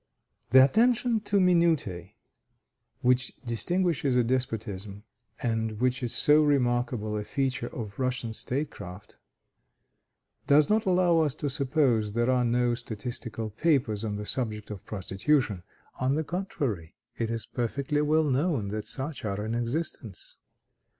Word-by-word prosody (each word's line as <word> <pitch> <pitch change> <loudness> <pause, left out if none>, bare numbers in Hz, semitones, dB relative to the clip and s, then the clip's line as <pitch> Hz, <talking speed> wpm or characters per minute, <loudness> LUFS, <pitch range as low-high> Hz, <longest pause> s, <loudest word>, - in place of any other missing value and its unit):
The 130 +2 +8
attention 235 - +2
to 205 - +1
minutiæ 165 - +2 0.9
which 125 0 +2
distinguishes 145 - +1
a 125 - +4
despotism, 110 -5 -3 0.4
and 115 -2 -1
which 130 +1 +1
is 120 -2 0
so 150 +1 +5
remarkable 120 -6 +1
a 105 - -3
feature 135 +1 -2
of 110 -3 -7
Russian 125 -3 -1
state 140 +6 -2
craft, 90 +3 -10 1.3
does 145 +4 +5
not 220 -1 +2
allow 180 -2 +4
us 150 -3 +1
to 145 -2 -3
suppose 130 -6 +1
there 120 +2 +2
are 125 -1 +2
no 120 0 +2
statistical 115 -1 -5
papers 120 -5 +1
on 105 -2 -2
the 105 0 -5
subject 110 -4 -2
of 100 -3 -7
prostitution; 105 +2 0 0.4
on 130 +2 +1
the 160 - 0
contrary, 140 - -3 0.2
it 115 -1 -1
is 115 -1 -3
perfectly 140 +4 -1
well 155 +2 +3
known 135 - 0
that 105 +1 -4
such 140 +2 -5
are 105 0 -3
in 110 - -3
existence. 120 - -4
125 Hz, 135 wpm, -28 LUFS, 110-150 Hz, 1.3 s, The